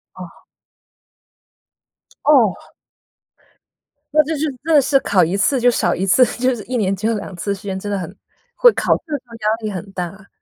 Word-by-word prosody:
哦。 - - -11 1.9
哦。 255 -10 +5 1.6
那 305 0 +5
就 315 +2 -3
是， 300 - -1 0.2
真 325 +1 0
的 290 - +7
是 275 +1 +2
考 185 -3 +2
一 170 +4 0
次 255 +7 +1
就 245 +1 +4
少 240 - +1
一 190 - -2
次， 250 +7 +5
就 255 0 +1
是 215 - -8
1 250 +1 -3
年 195 -3 0
只 210 +3 -3
有 230 - +1
2 195 -2 -7
次 200 +3 -3
时 200 +2 -10
间， 195 -2 -4
真 205 +1 -5
的 200 - -1
很 180 +2 -7 0.4
会 485 - +6
考 - - +1
试 320 - -15
的 295 - 0
时 260 - -19
候 230 - -12
压 215 -1 0
力 215 - -2
很 195 +1 -7
大。 190 +2 -7
215 Hz, 205 characters per minute, -19 LUFS, 195-260 Hz, 1.9 s, 的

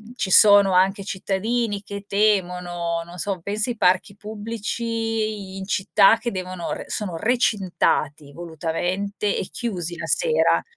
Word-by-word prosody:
ci 205 - -2
sono 205 -2 +7
anche 190 +2 +2
cittadini 205 +3 -2
che 200 0 -7
temono 180 -5 0
non 175 +1 -12
so, 190 +1 -2
penso 210 +6 -2
ai 240 - -3
parchi 185 +1 +2
pubblici 220 -1 -4
in 190 - -6
città 205 +2 +4
che 230 +1 -3
devono 185 -2 -5
re - - -6
sono 195 -5 -2
recintati 180 - 0
volutamente 175 +5 -3
e 185 - -3
chiusi 175 -7 -4
la - - -5
sera. 485 -1 +2
200 Hz, 135 wpm, -22 LUFS, 180-215 Hz, -, sono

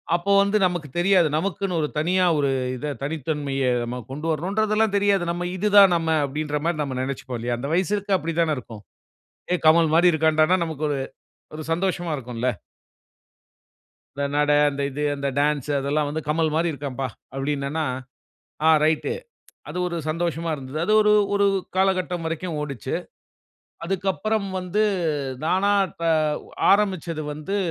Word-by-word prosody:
அப்போ 175 +3 -1
வந்து 200 +2 +1
நமக்கு 175 -4 -4
தெரியாது. 180 -2 +4
நமக்குன்னு 185 0 -2
ஒரு 150 - 0
தனியா 180 +3 +2
ஒரு 140 -1 +1 0.3
இதை 150 +3 -4
தனித்தன்மையை 140 -3 -1
நாம 125 +1 -5
கொண்டு 150 +4 -5
வரணுன்றதெல்லாம் 210 +6 +1
தெரியாது. 200 -2 +2
நம்ம 175 +1 -3
"இதுதான் 200 -2 +6
நம்ம" 165 -1 -1 0.2
அப்டீன்ற 150 +1 -3
மாரி 170 -2 0
நம்ம 130 -2 -4
நினைச்சிப்போம் 130 -2 -4
இல்லையா! 120 0 -2
அந்த 140 +3 -4
வயசுக்கு 195 +2 +1
அப்படி 165 -1 -4
தானே 155 -2 +1
இருக்கும். 110 -4 -9 0.7
"ஏய் 180 - 0
கமல் 160 -1 +5
மாரி 175 +1 +5
இருக்கான்டான்னா," 155 +3 +3
நமக்கு 155 -2 -4
ஒரு 140 - -1 0.6
ஒரு 155 - -6
சந்தோஷமா 175 -1 -1
இருக்கும்ல. 125 -2 -4 1.7
"இந்த 140 - -1
நடை, 145 0 +3
அந்த 140 0 -4
இது 145 +3 -4
அந்த 140 0 -2
டான்ஸ், 150 -1 0
அதெல்லாம் 145 +2 0
வந்து 155 +2 -3
கமல் 160 0 +1
மாரி 165 +1 +1
இருக்கான்ப்பா," 135 -2 -4 0.3
அப்படின்னான்னா, 140 +2 -2 0.8
"ஆ - - +7 0.2
ரைட்‌டு" 160 - +1 0.6
அது - - -5
ஒரு 170 -1 -3
சந்தோஷமா 165 0 -2
இருந்தது. 135 +2 -7
அது 215 - +2
ஒரு 210 0 +4 0.2
ஒரு 200 0 +3 0.3
காலகட்டம் 185 -2 +1
வரைக்கும் 165 0 -3
ஓடுச்சு. 140 -6 -5 0.9
அதுக்கப்புறம் 195 +3 -1
வந்து 185 +4 -1 0.6
நானா 190 +4 +2 0.3
த - - -2 0.7
ஆரம்பிச்சது 185 -6 +1
வந்து 155 +7 -4
160 Hz, 145 wpm, -23 LUFS, 145-185 Hz, 1.7 s, ஆ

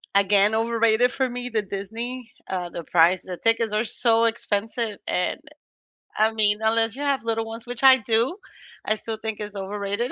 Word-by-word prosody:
again, 200 +2 +4
overrated 230 +1 +2
for 265 -2 -1
me, 245 0 -5
the 220 -2 0
Disney. 225 +5 -6 0.2
Uh, 180 -2 -3
the 170 - -7
price, 175 +2 +3
the 180 -2 -6
tickets 230 -1 +1
are 215 +2 +1
so 230 0 +2
expensive, 220 -1 -2
and 180 - 0 0.8
I 220 +1 +3
mean, 210 -1 +1
unless 225 +1 +1
you 285 - -7
have 280 -3 0
little 225 0 -1
ones, 225 +1 -8
which 245 +2 -7
I 265 0 +9
do, 230 - 0 0.5
I 215 - +2
still 220 0 -5
think 220 -1 -4
it's 210 -1 -6
overrated. 200 +4 -3
225 Hz, 180 wpm, -24 LUFS, 205-235 Hz, 0.8 s, I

